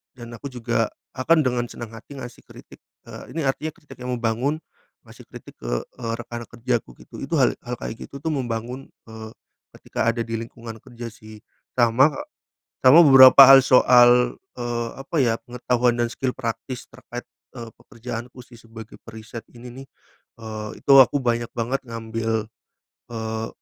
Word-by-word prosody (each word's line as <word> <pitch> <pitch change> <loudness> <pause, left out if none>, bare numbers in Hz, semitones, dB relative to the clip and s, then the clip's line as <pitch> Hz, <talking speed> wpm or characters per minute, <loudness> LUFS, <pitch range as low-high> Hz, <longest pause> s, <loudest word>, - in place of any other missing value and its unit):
dan 120 -2 -11
aku 140 - -7
juga 120 -3 -1 0.2
akan 155 +5 +2
dengan 125 -1 0
senang 115 -2 -9
hati 120 +5 -12
ngasih 125 -2 -9
kritik, - - -15 0.3
eee, - - -11
ini 160 -3 -2
artinya 150 +4 -2
kritik 145 -8 -16
yang 125 0 -3
membangun, 120 +5 -1 0.5
ngasih - - -15
kritik - - -12
ke, - - -6 0.2
eee, 115 -2 -6
rekan 120 0 -7
kerjaku 120 - -3
gitu, - - -14
itu - - -6
hal - - +3
hal 125 0 -6
kayak 110 - -7
gitu 140 - -9
tuh 160 +1 -2
membangun, 125 0 -4 0.2
eee, 110 0 -10 0.5
ketika - - -3
ada 115 0 -1
di 115 - -7
lingkungan 115 0 -9
kerja 120 -2 -9
sih. 110 -1 -14 0.4
Sama 120 +4 +4 0.7
sama 130 +5 +8
beberapa 130 -1 +9
hal 135 0 +9
soal, 125 -1 +5 0.2
eee, 120 -1 -3
apa 135 +5 -6
ya, 115 -3 +1
pengetahuan 125 -1 0
dan 120 - 0
skill 130 +1 -3
praktis 125 +1 -6
terkait, 120 0 -9 0.3
eee, 115 -2 -8
pekerjaanku 120 +1 -8
sih 120 0 -17
sebagai 115 -1 -12
periset 110 +1 -10
ini 120 +1 -11 0.2
nih, - - -23 0.5
eee, 110 -1 -6
itu 140 - +3
aku 135 +2 +5
banyak 120 -1 -1
banget 120 +3 -1
ngambil, 115 -1 -3 0.7
eee, 110 0 -4
120 Hz, 160 wpm, -23 LUFS, 115-130 Hz, 0.7 s, beberapa